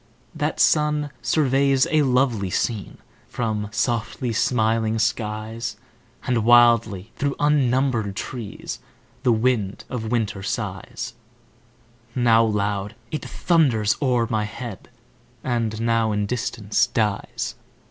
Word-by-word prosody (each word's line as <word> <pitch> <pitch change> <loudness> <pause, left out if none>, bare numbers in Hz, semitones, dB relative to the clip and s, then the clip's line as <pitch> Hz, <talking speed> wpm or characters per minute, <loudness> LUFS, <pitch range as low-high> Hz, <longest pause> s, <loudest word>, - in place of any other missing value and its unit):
That - - -2
sun 150 -1 +3
surveys 135 -2 +3
a 155 - +4
lovely 125 -7 +2
scene 100 +3 -2 0.3
From 110 -3 -2
softly 115 +1 -1
smiling 110 -1 +1
skies; 110 +1 -2 0.5
And 120 -3 +1
wildly 115 -4 +4
through 140 -1 -1
unnumbered 130 -7 +2
trees 115 0 -6 0.4
The 125 -2 +3
wind 110 -4 0
of 115 -3 -3
winter 110 -4 -1
sighs: - - -4 1.0
Now 115 -2 +5
loud, 105 -2 -1 0.2
it 155 - -3
thunders 125 - +2
o'er 125 -4 +2
my 110 -1 0
head, 105 -1 -8 0.5
And 115 -3 -1
now 115 -1 +1
in 105 0 0
distance 110 -2 0
dies. 105 -3 -1
115 Hz, 105 wpm, -23 LUFS, 110-125 Hz, 1.0 s, Now